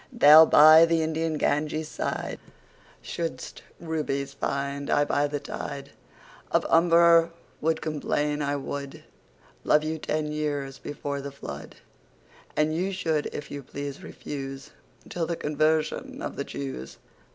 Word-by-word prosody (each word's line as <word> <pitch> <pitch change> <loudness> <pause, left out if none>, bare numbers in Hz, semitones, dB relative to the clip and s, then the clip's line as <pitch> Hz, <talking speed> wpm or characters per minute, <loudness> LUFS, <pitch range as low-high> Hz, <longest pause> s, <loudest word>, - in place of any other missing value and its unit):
Thou 160 - +8
by 155 +2 +8
the 165 -1 +2
Indian 160 0 -1
Ganges 155 +1 -1 1.0
sideShould'st 165 -7 -5 0.2
Rubies 145 -4 -3
find: 140 0 -3
I 145 - +3
by 145 0 +1
the 145 0 -3
TideOf - - -7 0.8
Humber 170 0 +5 0.3
would 160 +1 0
complain. 150 -1 -1
I 145 0 -1
wouldLove 140 +2 -4
you 160 +1 -3
ten 150 0 -2
years 145 -3 -3
before 145 -1 -5
the 140 0 -6
Flood:And 150 +2 -7
you 185 +4 -1
should 160 -5 -1
if 145 - -7
you 145 - -5
please 140 +1 -7
refuseTill 140 +4 -7
the 170 - -2
Conversion 155 +1 -1
of - - -5
the - - -4
Jews. 130 - -7
150 Hz, 120 wpm, -26 LUFS, 140-160 Hz, 1.0 s, Thou